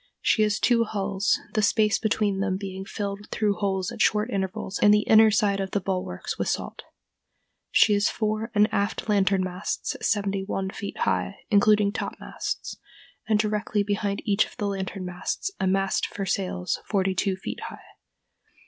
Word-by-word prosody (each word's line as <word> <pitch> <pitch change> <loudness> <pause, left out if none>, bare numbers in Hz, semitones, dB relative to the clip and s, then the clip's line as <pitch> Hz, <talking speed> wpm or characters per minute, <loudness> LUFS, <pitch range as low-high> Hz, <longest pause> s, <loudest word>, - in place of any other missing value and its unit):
She 220 - +2
has 210 -1 +2
two 235 -2 +3
hulls, 200 -2 0
the 215 - +2
space 210 +1 +3
between 210 -3 0
them 190 -1 0
being 190 -1 -6
filled 200 0 -5
through 205 -3 0
holes 190 0 -1
at 235 -2 -5
short 215 +3 +2
intervals 190 0 -3
in 205 - +5
the 210 0 +6
inner 220 0 +7
side 205 -2 +2
of 195 -1 -2
the 200 - 0
bulwarks 185 - -4
with - - -1
salt.... - - -3 0.9
She 210 - +5
has 205 0 +3
fore 215 +1 -2
and 210 0 +5
aft 200 +2 -1
lantern 195 -2 +2
masts 185 +1 -3
seventy 200 -2 0
one 195 -1 -3
feet 200 - -6
high, 195 - -1
including 210 0 +4
topmasts, - - -5 0.5
and 215 -1 +3
directly 210 -1 0
behind 200 0 -2
each 205 -1 +3
of - - -17
the 205 - -2
lantern 195 -1 -3
masts 180 - -3
a 190 - +1
mast 195 +1 +1
for 195 - -5
sails 180 -1 -1
forty 195 -2 0
two 190 +1 0
feet 190 - -6
high. - - -12
200 Hz, 170 wpm, -25 LUFS, 195-210 Hz, 0.9 s, inner